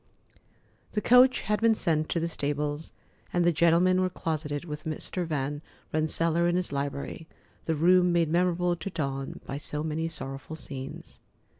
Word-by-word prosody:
The 210 - +1
coach 250 +3 +6
had 210 +1 -1
been 225 -1 +5
sent 155 -6 +1
to 170 - 0
the 165 - -1
stables, 145 0 -3 0.4
and 175 -1 +2
the 175 - +5
gentlemen 170 +3 +4
were 185 - +1
closeted 155 -3 -3
with 150 -2 -6
Mr. 165 +3 -3
Van 145 -1 -2 0.3
Rensselaer 165 +2 +1
in 175 - +2
his 180 -3 -1
library, 140 +3 -4 0.4
the 160 - 0
room 180 +3 +4
made 170 -2 +2
memorable 175 0 +2
to 170 +4 -5
Dawn 135 -6 -4
by 135 - -4
so 150 +1 -4
many 160 +1 -1
sorrowful 135 -1 -6
scenes. 135 -3 -8
160 Hz, 160 wpm, -28 LUFS, 150-175 Hz, 0.4 s, coach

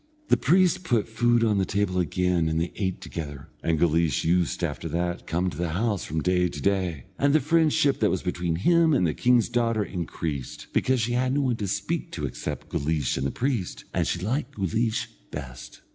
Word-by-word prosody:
The - - +6
priest 185 +5 +3
put 120 - +1
food 120 +1 +2
on 105 -3 +2
the - - +2
table 95 -1 0
again 90 0 +1
and 80 0 0
they 85 +1 -2
ate 95 -3 -2
together, 75 -4 -7
and 80 -1 +1
Guleesh 80 -1 +2
used 85 0 +1
after - - -3
that 85 +1 -1
to - - -22
come 90 +2 0
to 75 - -9
the 85 -2 -1
house 105 +1 0
from 80 0 -2
day 90 -1 +2
to 75 - -7
day, 90 -6 0
and 140 0 +3
the - - +6
friendship 155 -2 +2
that 105 - +3
was 95 - -1
between 85 -1 -1
him 165 - +4
and 90 - +3
the 80 - +1
king's 125 -2 +3
daughter 115 -2 +1
increased, 80 -8 -5
because 130 -2 +2
she 115 +2 0
had 125 +1 +1
no 145 - +2
one 125 -4 0
to 105 - -3
speak - - -2
to - - -3
except - - -5
Guleesh 75 -2 0
and 65 +1 -1
the - - -3
priest, 120 -8 -2
and - - +1
she - - 0
liked 125 - -2
Guleesh 110 +4 0 0.2
best. 65 -2 -8
95 Hz, 210 wpm, -26 LUFS, 85-120 Hz, 0.2 s, The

